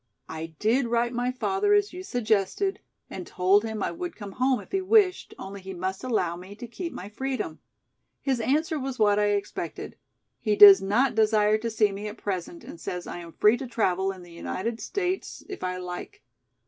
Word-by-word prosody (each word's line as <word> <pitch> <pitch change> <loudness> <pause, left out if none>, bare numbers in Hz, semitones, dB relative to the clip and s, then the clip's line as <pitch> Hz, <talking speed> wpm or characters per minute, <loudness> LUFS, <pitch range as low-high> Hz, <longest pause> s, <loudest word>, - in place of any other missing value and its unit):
I 160 0 -7
did 235 - +2
write 235 +1 +1
my 245 +1 0
father 385 +10 +1
as 410 -2 +1
you 360 - -6
suggested 245 - 0 0.3
and 185 - -7
told 190 +3 +3
him 220 -2 -3
I - - -1
would 350 0 -6
come 205 -3 -8
home 255 +4 +1
if - - -13
he 385 - 0
wished, 385 -1 +3
only 195 0 -8
he 190 0 -7
must 190 +3 -4
allow 200 -9 0
me 185 +3 -10
to 240 - -8
keep 335 +9 -6
my 185 - -7
freedom. 260 +5 -4 0.6
His 265 -3 0
answer 300 +6 +1
was 265 -1 -4
what 210 -1 +4
I 210 - +3
expected. 200 - -5 0.4
He 215 -2 +1
does 200 -2 +10
not 215 +8 +2
desire 215 -1 +3
to 230 +1 -2
see 215 -2 +2
me 200 +2 -5
at 210 +2 -7
present 180 -4 -4
and 170 - -10
says 180 -1 -4
I - - -6
am 170 -1 -10
free 210 +3 +4
to 260 - -6
travel 195 -5 0
in 185 -2 -11
the 175 - -14
United 220 +6 -4
States 375 - -3
if 390 - -7
I 185 0 -2
like. 180 -5 -7
215 Hz, 200 wpm, -26 LUFS, 190-265 Hz, 0.6 s, does